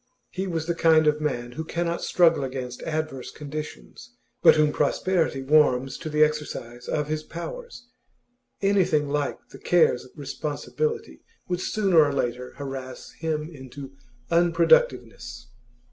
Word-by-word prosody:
He 190 +1 -3
was 165 -3 -2
the 170 - 0
kind 160 -1 +4
of 150 0 +2
man 120 -5 -2
who 160 +6 -5
cannot 170 +1 -2
struggle 170 -5 +3
against 130 -2 -5
adverse 155 -5 -3
conditions, 150 - -8 0.3
but - - +8
whom 155 -1 +3
prosperity 150 -1 0
warms 135 -2 +3
to 160 - -5
the 150 0 +4
exercise 135 -6 -3
of 150 -1 -1
his 155 0 -2
powers. 245 - -8 0.8
Anything 180 -7 +2
like 145 0 -1
the - - -12
cares 170 -8 +3
of - - -15
responsibility 155 - -4 0.3
would 180 0 -2
sooner 190 -7 +3
or 145 -1 0
later 125 -1 -2
harass 135 -2 -7
him 155 -2 -3
into 135 0 -10 0.4
unproductiveness. 130 - +2
150 Hz, 135 wpm, -25 LUFS, 135-170 Hz, 0.8 s, but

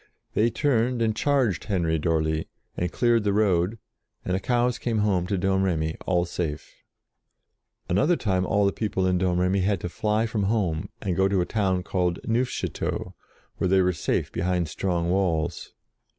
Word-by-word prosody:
They 110 +3 +3
turned 125 -1 +1
and 110 -2 +1
charged 130 - +1
Henry 85 -5 0
d'Orly, 80 0 0 0.3
and 90 0 -2
cleared 120 0 +2
the 100 -1 +1
road, 100 0 +2 0.5
and 90 - -1
the 95 - +1
cows 120 +3 +1
came 115 -2 -1
home 100 -4 +1
to 100 - 0
Domremy, 90 -4 0
all 90 -2 +2
safe. 80 -4 -4 1.1
Another 100 - +3
time 95 - 0
all 100 +1 +2
the 100 - +3
people 100 -4 -1
in 90 -1 +2
Domremy 90 +1 +1
had 95 0 +1
to 90 - -3
fly 105 +4 0
from 105 -3 -1
home, 95 -7 0
and 95 -4 -1
go 95 +1 +3
to 95 -1 +1
a - - 0
town 95 -4 0
called 90 -2 0
Neufchateau, 120 +2 -2 0.4
where - - 0
they 95 +1 +4
were 90 0 +2
safe 80 - -1
behind 90 -1 0
strong 85 +1 -1
walls. 85 -3 -1
95 Hz, 165 wpm, -25 LUFS, 90-110 Hz, 1.1 s, they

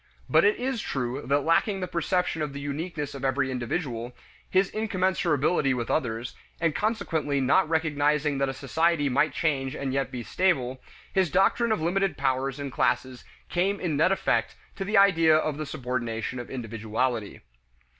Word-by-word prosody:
But - - +4
it 440 -1 +4
is 255 -3 -2
true 130 +1 -3
that 140 +2 +2
lacking 190 +5 +2
the 185 - -3
perception 180 -1 -1
of 150 -2 -2
the 140 - -6
uniqueness 145 +1 -4
of 140 -1 -8
every 135 0 +1
individual, 125 -1 -3 0.3
his 190 +1 +2
incommensurability 180 -9 +1
with 120 -2 -3
others, 120 -4 -1 0.3
and 165 -2 +1
consequently 165 -10 -1
not 145 +6 +3
recognizing 150 -2 +1
that 140 0 +1
a - - -3
society 145 +2 +1
might 140 +3 +2
change 135 -2 -1
and 135 -1 -3
yet 135 0 0
be 125 -2 -5
stable, 130 -7 0 0.3
his 190 -3 +2
doctrine 195 +7 +2
of 215 - +1
limited 180 0 0
powers 135 0 0
and 140 -1 -4
classes 130 0 0 0.2
came 195 +3 0
in 165 -5 -1
net 155 +6 +3
effect 195 - 0 0.2
to 195 - -3
the 205 +2 +1
idea 165 -5 +6
of 155 -2 -1
the 155 -1 -4
subordination 125 -2 -3
of 120 - -7
individuality. 115 -1 -3
145 Hz, 165 wpm, -27 LUFS, 130-180 Hz, 0.3 s, idea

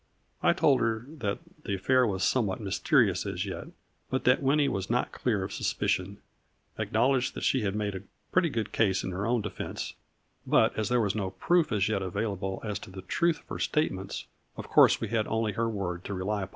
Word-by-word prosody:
I - - +4
told 135 -3 +3
her 115 0 0
that 100 -3 -1 0.3
the 100 - -1
affair 125 +6 +3
was 95 -2 -1
somewhat 105 -7 +1
mysterious 100 -3 +2
as - - -2
yet, - - -6 0.4
but 130 - -1
that 125 +3 +4
Winnie 140 +1 +3
was 95 -4 -2
not 120 +1 +1
clear 105 -6 0
of 95 - -5
suspicion; 100 +2 -1 0.6
acknowledged 125 +3 +1
that - - -5
she 130 - +2
had 100 -1 -1
made 105 -1 -1
a 95 - -5 0.3
pretty 180 -2 +3
good 115 -6 -3
case 95 -4 +2
in 95 - -3
her 95 +4 -2
own 120 -1 +2
de 105 -1 -4
fense, - - -5 0.5
but, - - +3
as 110 -1 -1
there 125 0 +3
was 105 -2 +1
no 100 -3 -2
proof 160 - +2
as 100 -3 +2
yet 105 -2 0
available 95 0 -2
as 105 -2 -2
to - - -11
the 95 0 -9
truth 170 - +1
of - - -31
her - - -5
statements, 95 -11 -1 0.3
of - - -6
course - - +6
we - - -3
had 110 -2 0
only 110 -1 0
her 115 +3 -1
word 90 -5 -3
to 100 - -3
rely 100 +3 -1
upon. 95 - -5
105 Hz, 215 wpm, -29 LUFS, 95-125 Hz, 0.6 s, course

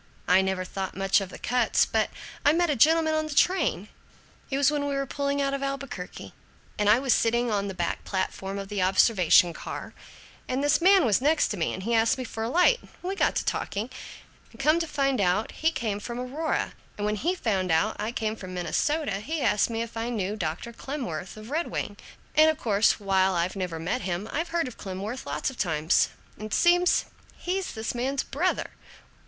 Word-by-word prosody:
I 185 +1 +5
never 190 -1 -1
thought 190 0 -5
much 195 +1 +3
of 195 - -5
the - - -9
Kutz. 245 -1 +2
But - - 0 0.3
I 290 - +5
met 345 -1 +2
a - - +1
gentleman 315 +5 +4
on 310 0 0
the 300 - -6
train 310 - +2 0.6
it 270 - -1
was 280 0 +4
when 290 -1 -1
we 280 - -1
were 275 0 -1
pulling 280 +1 -2
out 275 0 0
of 275 - -2
Albuquerque, 275 -9 -5 0.5
and 210 0 +3
I 215 - +7
was 260 -2 +2
sitting 235 +1 +1
on 200 -1 0
the 195 - -5
back 175 -2 -2
platform 195 0 -3
of 195 0 -5
the 205 -1 -2
observation 185 -2 +4
car, - - -7 0.5
and 260 +2 -1
this 290 +3 +3
man 380 -1 +6
was 215 -1 +3
next 300 +3 +3
to 210 - -3
me 165 - 0
and 185 - -6
he 235 +3 -1
asked 225 +2 +3
me 260 - -3
for 225 -2 -6
a 225 - -1
light, 360 - +4
and - - -18
we 370 +2 -2
got - - +1
to - - -1
talking, 215 +5 -2 0.6
and - - -18
come 305 +4 +3
to 330 - -2
find 275 -5 0
out, 190 +4 +1
he 320 +1 0
came 215 -9 -2
from 235 +3 -6
Aurora, 280 +6 -2 0.2
and 205 - -2
when 210 0 0
he 350 - 0
found 195 - -1
out 165 +7 +2
I 215 +2 -2
came 220 -3 -2
from 185 -4 -8
Minnesota 200 - 0
he 310 +9 -3
asked 210 - +2
me 230 0 -2
if 230 0 -10
I 225 +1 -2
knew 210 -3 -2
Dr. 185 +5 -4
Clemworth 230 - -5
of 215 +4 -10
Red 325 +3 0
Wing, - - -4 0.4
and 310 +1 +6
of 315 - 0
course, 215 -7 +2
while 190 -2 +2
I've 175 +3 0
never 180 -4 -3
met 165 +2 -2
him, 180 +3 -3
I've 330 +3 -1
heard 335 -4 0
of 250 - -10
Clemworth 200 - -5
lots 150 - -2
of 260 - -14
times, 160 -2 +2 0.3
and 215 0 -7
seems 355 +5 +4 0.3
he's 375 +1 -3
this 220 0 -3
man's 260 +3 -1
brother! 350 +7 -1
230 Hz, 215 wpm, -27 LUFS, 195-285 Hz, 0.6 s, I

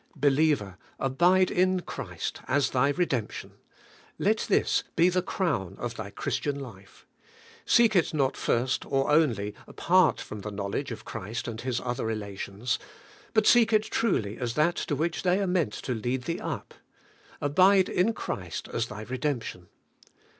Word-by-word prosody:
Believer, 140 -9 +2 0.2
abide 175 +8 +3
in 185 0 +2
Christ - - -5
as 140 +1 +2
thy 130 +2 +3
redemption. 140 -8 -2 0.7
Let - - +2
this - - +2
be 170 +2 +5
the 185 0 +1
crown 140 - -2
of 120 -1 -4
thy 110 -3 -6
Christian 140 +7 -2
life. 100 -8 -12 0.6
Seek 230 -3 +5
it 175 - +3
not 140 -4 +1
first 130 +2 0
or 135 +1 +1
only, 115 -10 +2
apart 180 -2 +3
from 105 - -7
the 105 - -5
knowledge 100 -1 -3
of - - -7
Christ 110 +5 -5
in 115 -1 -5
His 125 -1 -2
other 120 -1 -3
relations. 105 +1 -3 0.6
But 220 -1 +4
seek 235 -2 +6
it 215 -1 +4
truly 115 - -1
as 120 -2 -2
that 160 +3 +2
to 145 - -1
which 160 +4 -1
they 180 +1 +2
are 200 - +1
meant 180 - 0
to 125 - -3
lead 125 +3 -2
thee 165 +6 -3
up. - - -5 0.7
Abide 185 +6 +4
in 195 +6 +1
Christ 90 - -5
as 115 0 -1
thy 105 -1 -7
redemption. 125 -7 -3
135 Hz, 155 wpm, -27 LUFS, 110-175 Hz, 0.7 s, seek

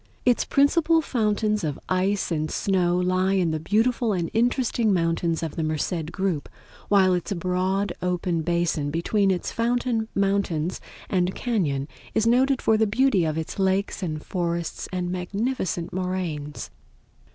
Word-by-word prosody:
Its 245 -1 +3
principal 325 +4 +3
fountains 215 - 0
of 150 -3 -2
ice 190 +1 0
and 155 -1 -1
snow 180 -3 +1
lie 185 +1 +1
in 180 -4 +2
the 155 - -1
beautiful 225 +6 +1
and 175 -3 -2
interesting 240 -1 +1
mountains 165 -2 0
of 160 - -4
the - - -2
Merced 155 +1 -2
group, 185 -6 -2 0.4
while 190 -2 +5
its 180 +1 -2
broad 185 +2 0
open 180 -2 0
basin 170 -3 0
between 195 +6 +1
its 180 -2 -1
fountain 235 -1 0
mountains 195 -4 0 0.3
and 185 -1 0
cañon 155 - -1 0.3
is 220 - +2
noted 255 +3 +3
for 220 - +4
the 220 0 +3
beauty 220 -4 +3
of 155 0 -1
its 160 +4 -4
lakes 195 +2 0
and 155 -4 -4
forests 170 -3 -3
and 180 -1 -2
magnificent 185 -1 -2
moraines. 175 -6 -3
185 Hz, 145 wpm, -25 LUFS, 170-215 Hz, 0.4 s, while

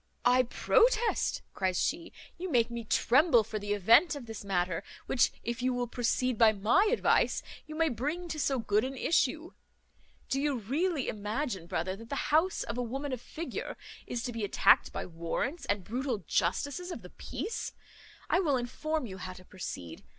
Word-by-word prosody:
"I 250 +1 +6
protest," 470 - +2
cries 185 -2 0
she, 335 +3 -1 0.3
"you 370 +1 -3
make 240 -5 +2
me 235 0 -4
tremble 250 +2 +4
for 215 0 -4
the 205 0 -2
event 230 - +5
of 280 -4 -7
this 225 -2 -7
matter, 185 -2 -1 0.2
which, 245 - +3
if 235 +1 -3
you 255 0 +1
will 245 0 0
proceed 245 0 0
by 225 -2 +7
my 235 - +3
advice, 485 - +2 0.2
you 310 - -7
may 325 +1 +3
bring 300 +9 -3
to 310 - -3
so 275 -2 +1
good 215 -2 +1
an 265 +1 -4
issue. 315 +3 +1 0.8
Do 270 - 0
you 285 -2 +1
really 280 - -1
imagine, 210 - -3
brother, 185 +3 -2
that 230 +3 -12
the 280 - -2
house 335 +4 +3
of 245 - -4
a - - +1
woman 270 +4 -3
of 250 - -4
figure 335 +6 -6 0.3
is 235 -1 -3
to 245 - -3
be 230 -2 -4
attacked 200 - +4
by - - -4
warrants 170 - -3
and 200 -2 0
brutal 240 -1 -2
justices 285 - 0
of 235 - -7
the 180 - -11
peace? 405 - -5 0.6
I - - +3
will 295 -8 +2
inform 285 +5 -2
you 190 -4 -8
how 185 0 -6
to 185 0 -14
proceed. 130 - -7
245 Hz, 185 wpm, -30 LUFS, 210-300 Hz, 0.8 s, by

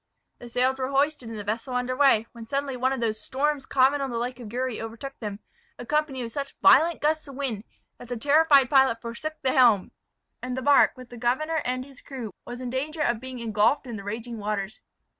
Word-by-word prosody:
The 240 - -10
sails 255 +2 +1
were 260 0 -1
hoisted 280 -2 0
and 225 - -6
the 205 - -5
vessel 225 +5 -3
under 250 +1 -1
weigh, 265 -5 +4
when 230 -1 -11
suddenly 275 +1 -2
one 255 +1 +1
of 265 -3 -2
those 220 -1 -1
storms 285 +1 -1
common 275 +2 +3
on 270 - -2
the 235 - -3
lake 245 +2 -3
of 225 -4 -9
Uri 255 -1 -2
overtook 230 +5 -7
them, 210 -2 -6 0.4
accompanied 275 0 -1
with 230 - -6
such 280 +2 -5
violent 330 +3 +5
gusts 310 +1 0
of 275 - -10
wind, 245 -6 -3 0.3
that 245 - -10
the 245 0 -4
terrified 285 +1 +5
pilot 265 -3 +4
forsook 235 +7 -5
the 260 - +2
helm; 235 -7 +4 0.5
and 255 0 -4
the 260 - -3
bark, 285 -1 +5
with 255 -1 -12
the 240 - -9
governor 305 +7 0
and 255 +1 -2
his 275 -2 -16
crew, 245 -7 -7
was 245 0 -7
in 250 -1 -5
danger 300 +5 -3
of 240 -5 +1
being 260 +1 -8
ingulfed 230 +4 +1
in 240 -3 -6
the 200 - -7
raging 225 +3 -5
waters. 210 0 -3
255 Hz, 220 wpm, -26 LUFS, 230-275 Hz, 0.5 s, violent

